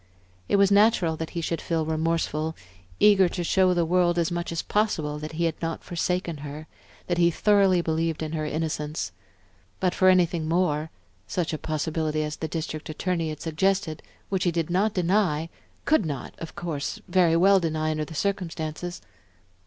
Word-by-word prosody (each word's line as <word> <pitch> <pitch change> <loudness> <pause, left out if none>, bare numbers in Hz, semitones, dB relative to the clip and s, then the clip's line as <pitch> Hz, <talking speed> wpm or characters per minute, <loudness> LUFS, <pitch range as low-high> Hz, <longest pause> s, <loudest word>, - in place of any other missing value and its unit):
It - - +3
was 200 0 +4
natural 200 -5 +4
that 160 0 -4
he - - 0
should 165 0 -2
feel 165 -2 -1
remorseful, 160 0 -1 0.4
eager 195 -3 +6
to 175 - -3
show 190 +2 +3
to 180 - +3
the 170 -1 +2
world 175 0 +2
as 170 0 +1
much 175 0 -3
as 165 - -2
possible 155 -9 0
that 155 +1 -6
he 170 +2 -1
had 165 -2 -2
not 165 -1 -3
forsaken 175 -1 -2
her, 145 +2 -7 0.4
that 175 -1 -1
he 170 0 +5
thoroughly 195 0 +3
believed 160 -1 -1
in 155 - -4
her 155 -1 -2
innocence. 155 - -3 0.7
But 180 -1 +1
for 185 - +4
anything 170 -3 +3
more, 160 -2 +1 0.4
such 170 +7 -2
a 155 - -3
possibility 155 0 -1
as 150 0 -4
the 160 - -3
District 155 -1 -5
Attorney 165 +1 -1
had 155 -1 -6
suggested, 160 -1 0 0.3
which 190 -2 0
he 175 - +2
did 165 0 -2
not 200 +4 +1
deny, 175 -4 +1 0.4
could 310 -7 +3
not, 145 -6 -5
of 165 - -8
course, 165 +3 -4
very 175 -2 +3
well 195 +3 +5
deny 155 -2 -1
under 155 0 -2
the 160 - -10
circumstances?... 175 -3 -3
165 Hz, 180 wpm, -26 LUFS, 155-180 Hz, 0.7 s, eager